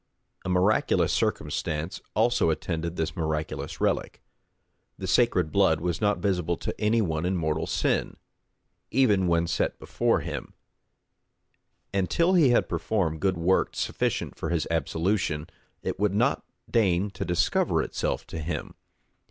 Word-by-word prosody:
A 95 Hz, -, -4 dB
miraculous 90 Hz, +4 st, +2 dB
circumstance 75 Hz, +2 st, -2 dB
also 120 Hz, -4 st, +3 dB
attended 85 Hz, +1 st, -2 dB
this 80 Hz, -2 st, -2 dB
miraculous 80 Hz, -2 st, -3 dB
relic; -, -, 0 dB, 0.8 s
the -, -, -5 dB
sacred 90 Hz, -10 st, +2 dB
blood 95 Hz, -6 st, +3 dB
was 85 Hz, 0 st, -2 dB
not 105 Hz, -1 st, +2 dB
visible 90 Hz, -4 st, 0 dB
to -, -, -4 dB
any 110 Hz, +1 st, +3 dB
one 80 Hz, -3 st, -1 dB
in 90 Hz, +1 st, 0 dB
mortal 80 Hz, -1 st, -1 dB
sin, -, -, 0 dB, 0.7 s
even 105 Hz, -8 st, +3 dB
when 85 Hz, -1 st, +2 dB
set 85 Hz, -, -1 dB
before -, -, 0 dB
him; -, -, -6 dB, 1.4 s
and 95 Hz, -2 st, 0 dB
till 170 Hz, +2 st, +3 dB
he 165 Hz, -8 st, +5 dB
had 120 Hz, -, +3 dB
performed 85 Hz, -8 st, -1 dB
good 95 Hz, -2 st, +1 dB
works 90 Hz, +3 st, +1 dB
sufficient -, -, -1 dB
for -, -, -4 dB
his 85 Hz, -2 st, 0 dB
absolution, 80 Hz, -1 st, 0 dB, 0.4 s
it -, -, -3 dB
would 100 Hz, -1 st, +1 dB
not 120 Hz, +6 st, +2 dB, 0.2 s
deign 100 Hz, -4 st, +2 dB
to -, -, -4 dB
discover 90 Hz, 0 st, +1 dB
itself -, -, -2 dB
to 80 Hz, -, -6 dB
him. 80 Hz, +3 st, -4 dB
90 Hz, 140 wpm, -27 LUFS, 80-105 Hz, 1.4 s, he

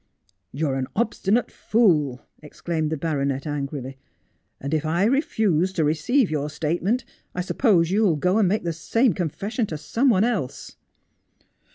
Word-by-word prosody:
' 95 Hz, 0 st, -39 dB
You 150 Hz, +2 st, -1 dB
are 135 Hz, -, -1 dB
an 130 Hz, -1 st, -2 dB
obstinate 225 Hz, 0 st, 0 dB
fool,' 155 Hz, -, +1 dB, 0.2 s
exclaimed 155 Hz, +1 st, -3 dB
the 160 Hz, -, -1 dB
baronet 140 Hz, -3 st, -1 dB
angrily. 140 Hz, -2 st, -4 dB, 0.3 s
' -, -, -47 dB
And 140 Hz, +3 st, -4 dB
if 155 Hz, -, +1 dB
I 165 Hz, +4 st, +1 dB
refuse 210 Hz, -, +1 dB
to 165 Hz, -, +1 dB
receive 165 Hz, -, +2 dB
your 150 Hz, -1 st, -1 dB
statement 175 Hz, -, -1 dB, 0.3 s
I 180 Hz, -, -1 dB
suppose 180 Hz, -, +2 dB
you 205 Hz, +3 st, +2 dB
will 190 Hz, -7 st, +3 dB
go 180 Hz, +8 st, +1 dB
and 205 Hz, -, +4 dB
make 210 Hz, +3 st, 0 dB
the 170 Hz, -1 st, -2 dB
same 225 Hz, +8 st, +1 dB
confession 200 Hz, -, -2 dB
to 155 Hz, -, -5 dB
some 230 Hz, -, +1 dB
one 200 Hz, -4 st, +4 dB
else.' 215 Hz, -, -2 dB
170 Hz, 170 wpm, -24 LUFS, 150-215 Hz, 0.3 s, and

